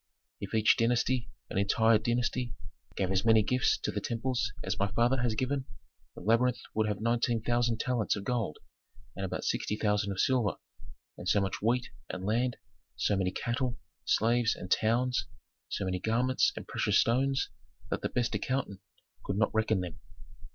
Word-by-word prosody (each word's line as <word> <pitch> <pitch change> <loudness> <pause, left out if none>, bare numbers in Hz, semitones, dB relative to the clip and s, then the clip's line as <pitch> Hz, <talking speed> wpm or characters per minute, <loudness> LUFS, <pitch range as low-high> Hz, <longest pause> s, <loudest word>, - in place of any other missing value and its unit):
"If - - -5
each 110 0 +5
dynasty, 120 +1 +1 0.2
an - - 0
entire 110 +2 +4
dynasty, 120 0 -1 0.4
gave 95 -1 0
as 95 0 +2
many 110 -1 +5
gifts 125 +4 +2
to - - 0
temples 115 -1 -1
as 95 +1 -2
my 100 - +2
father 120 +3 +3
has 120 -3 +1
given, 130 +3 -1 0.5
the - - -9
labyrinth 115 +5 +3 0.2
would 110 0 +1
have 105 -2 -2
nineteen 115 0 +1
thousand 120 0 +1
talents 125 -4 0
of 100 - -5
gold, 115 -8 -1 0.6
about - - -3
sixty 105 - -1
thousand 105 -2 +1
of 95 - -4
silver, 125 -7 +2 0.6
and - - -3
so 100 - +4
much 95 -1 -2
wheat, 120 +2 +1 0.2
and 95 0 -5
land, 120 +4 +1 0.4
so 110 -2 +1
many 95 -1 +1
cattle, 120 +5 -2 0.3
slaves, 115 +1 +2
and 90 - -9
towns, 120 +1 +2 0.4
so 100 - -2
many 90 -1 -1
garments 120 +6 +2
and - - -7
precious - - +1
stones, 135 +3 +2 0.4
that - - -1
the - - -1
best 120 -1 0
accountant 130 -7 -2 0.4
could 100 - -2
not 110 -1 +2
reckon 110 -3 +2
them." 90 -3 -6
115 Hz, 165 wpm, -30 LUFS, 105-125 Hz, 0.6 s, each